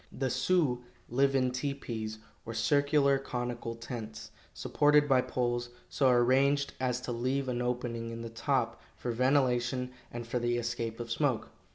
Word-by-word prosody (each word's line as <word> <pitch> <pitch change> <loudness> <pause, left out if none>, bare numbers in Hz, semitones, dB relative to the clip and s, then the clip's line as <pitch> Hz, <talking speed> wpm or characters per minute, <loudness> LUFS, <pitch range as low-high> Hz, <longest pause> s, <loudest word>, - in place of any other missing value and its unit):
The 130 -1 -2
Sioux 140 -7 +2 0.3
live 135 +3 +2
in 130 -1 +2
tepees, 125 -5 -3 0.3
or 115 - -6
circular 140 +4 +3
conical 120 -3 -4
tents, 115 -2 -7 0.2
supported 150 0 +3
by 130 -2 +5
poles, 120 -1 -1 0.2
so 135 -2 +3
arranged 135 +3 +3
as 125 -1 0
to 125 - -4
leave 130 +3 -1
an 125 -1 -1
opening 120 -2 -2
in 115 0 -6
the 115 - -5
top 125 +1 -1 0.2
for 120 - -3
ventilation 125 0 +2 0.2
and 120 0 -5
for 120 +2 -1
the 120 0 +1
escape 115 -1 -3
of 115 -1 -5
smoke. 130 -2 0
125 Hz, 155 wpm, -31 LUFS, 120-135 Hz, 0.3 s, by